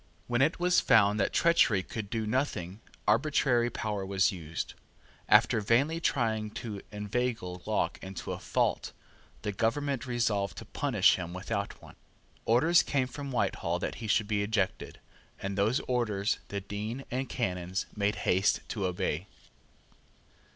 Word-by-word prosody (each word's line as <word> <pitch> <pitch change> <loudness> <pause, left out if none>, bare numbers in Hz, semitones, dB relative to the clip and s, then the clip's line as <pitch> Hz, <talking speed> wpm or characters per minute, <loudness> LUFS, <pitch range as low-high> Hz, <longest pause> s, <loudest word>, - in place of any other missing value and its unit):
When 120 +1 0
it 155 +6 +2
was 180 0 +4
found 105 -1 +4
that 100 - +1
treachery 140 - +4
could 110 0 -6
do 110 -1 -2
nothing, 110 -5 -2 0.3
arbitrary 120 0 +3
power 105 -3 -3
was 95 +1 +2
used. 85 -3 -5 0.6
After 110 - +5
vainly 135 +10 +2
trying 110 -8 0
to 105 -4 -5
inveigle 105 -3 -2
Locke - - 0
into 95 -1 -6
a - - -4
fault, - - 0 0.5
the 105 - -1
government 130 +5 -1
resolved 105 -6 0
to - - -7
punish - - +3
him 85 -1 -5
without 100 +2 -3
one. - - -14 0.5
Orders 160 +10 +5
came 135 -3 0
from 140 +2 -7
Whitehall 95 -7 0
that - - -3
he 110 - -4
should 105 0 +2
be 105 -1 0
ejected; 100 -3 -1 0.4
and 100 0 -3
those 110 +7 +2
orders 110 -5 0
the 100 0 -4
Dean 105 +6 -5
and 130 +2 -2
Canons 90 -5 -2
made 100 -1 +1
haste 95 +3 +3
to 100 -4 -1
obey. 90 0 -2
105 Hz, 145 wpm, -30 LUFS, 100-125 Hz, 0.6 s, After